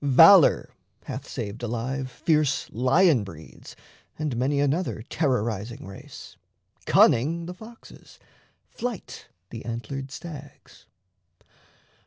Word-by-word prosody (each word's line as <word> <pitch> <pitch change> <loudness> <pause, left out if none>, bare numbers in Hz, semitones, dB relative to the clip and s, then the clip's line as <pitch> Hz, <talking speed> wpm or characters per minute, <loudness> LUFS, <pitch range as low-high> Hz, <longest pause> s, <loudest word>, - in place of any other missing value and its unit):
Valour 145 +5 +6 0.3
hath - - -7
saved 105 +4 -6
alive 125 +3 -3
fierce 150 -1 0
lion 130 - +3
breeds 80 -5 -12 0.4
And 150 -5 -2
many 135 +4 0
another 145 -4 -1
terrorizing 120 - -2
race, 95 0 -11 0.5
Cunning 160 +8 +4
the 180 - -6
foxes, 220 +5 -15 0.5
flight 240 -5 -6 0.2
the 115 - -7
antlered 130 +4 -5
stags. 145 -1 -11
135 Hz, 95 wpm, -25 LUFS, 115-160 Hz, 0.5 s, Valour